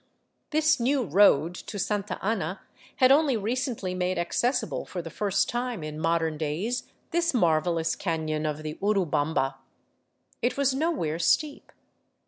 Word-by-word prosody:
This 310 -1 +3
new 260 +2 +2
road 175 -4 +4
to 205 - -8
Santa 205 0 -2
Ana 200 -3 -1 0.3
had 255 -1 +5
only 280 -3 +4
recently 225 -3 -2
made 185 0 -1
accessible 240 +7 0
for 185 - -6
the 165 -1 -6
first 200 +2 0
time 240 -6 -3
in 155 0 -6
modern 165 -1 0
days 175 - -2 0.2
this 335 -3 +1
marvelous 165 -3 +2
cafion 155 -3 -2
of 150 +1 -5
the 155 0 -6
Urubamba. 160 -9 +1 0.8
It 245 +3 0
was 275 -1 +2
nowhere 270 - -1
steep. 290 - 0
195 Hz, 135 wpm, -27 LUFS, 160-250 Hz, 0.8 s, had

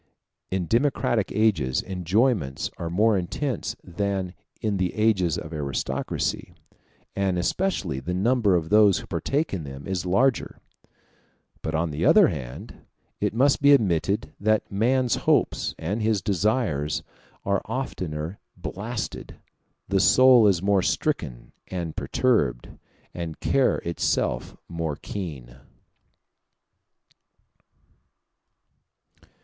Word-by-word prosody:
In 95 -2 -1
democratic 120 - +1
ages 90 - +1
enjoyments 95 - 0
are 85 - -4
more 105 +5 +3
intense 115 +7 -2
than 95 0 -2 0.3
in 105 -3 -1
the 95 -1 -1
ages 100 -7 +2
of 75 - -7
aristocracy, 70 -3 -3 0.6
and 95 -2 0
especially 90 - -1
the 90 +7 -4
number 105 0 +2
of 80 -2 -1
those 105 -2 +5
who - - -6
partake 150 0 -1
in 90 -5 -3
them 70 0 -9
is 95 -2 -2
larger: 120 +8 +1 1.0
but, 80 0 -3
on 80 0 0
the 75 - -3
other - - +6
hand, 60 -3 -7 0.4
it - - -1
must 135 +4 +3
be 140 0 +7
admitted 95 - +1
that 110 +1 +1
man's 120 +4 +2
hopes - - +1
and 100 +8 -3
his 110 -1 +2
desires 95 - 0 0.4
are 100 0 +1
oftener 90 - -4 0.2
blasted, 100 +7 -5 0.5
the 95 +1 +1
soul 130 0 +6
is 95 -3 +2
more 100 -1 +3
stricken - - -2 0.2
and 85 -4 -4
perturbed, 75 - 0 0.4
and 85 -2 -6
care 135 -1 +2
itself 85 0 -1
more 80 -3 -3
keen. 70 -10 -7
95 Hz, 110 wpm, -25 LUFS, 80-110 Hz, 1.0 s, be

